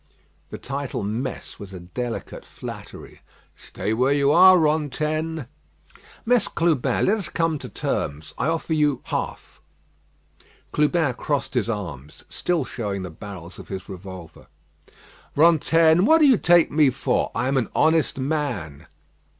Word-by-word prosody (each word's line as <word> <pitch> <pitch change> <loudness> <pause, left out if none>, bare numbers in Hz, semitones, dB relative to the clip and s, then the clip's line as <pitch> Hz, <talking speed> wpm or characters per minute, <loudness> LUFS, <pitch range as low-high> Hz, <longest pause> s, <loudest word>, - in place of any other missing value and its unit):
The - - -7
title 140 -4 -4
"Mess" 115 +6 -4
was 95 -2 -9
a - - -7
delicate 115 +7 -6
flattery. - - -10 0.3
"Stay 105 - -4
where 125 +4 +2
you 140 0 +3
are, 185 +3 +8
Rantaine." 155 0 -1 0.8
"Mess 240 -2 +3
Clubin, 150 -7 +1
let 215 +3 +2
us 195 - -4
come 165 -2 0
to - - -8
terms. 75 +2 -3
I 125 - 0
offer 165 0 -1
you 150 -4 +1
half." - - -5 1.1
Clubin 150 -2 +2
crossed 140 +2 -2
his 120 -3 0
arms, 75 - -6
still 175 -2 -1
showing 100 -5 -4
the 90 - -6
barrels 90 0 -10
of - - -11
his 95 -1 -6
revolver. 95 -2 -10 0.9
"Rantaine, 165 +1 +4
what 320 +7 +6
do 315 - +5
you 260 -6 +5
take 175 -1 +4
me 150 -2 +4
for? 130 0 0
I - - 0
am 135 - 0
an 125 -5 0
honest 160 -3 +2
man." 130 - -3
140 Hz, 140 wpm, -23 LUFS, 100-160 Hz, 1.1 s, are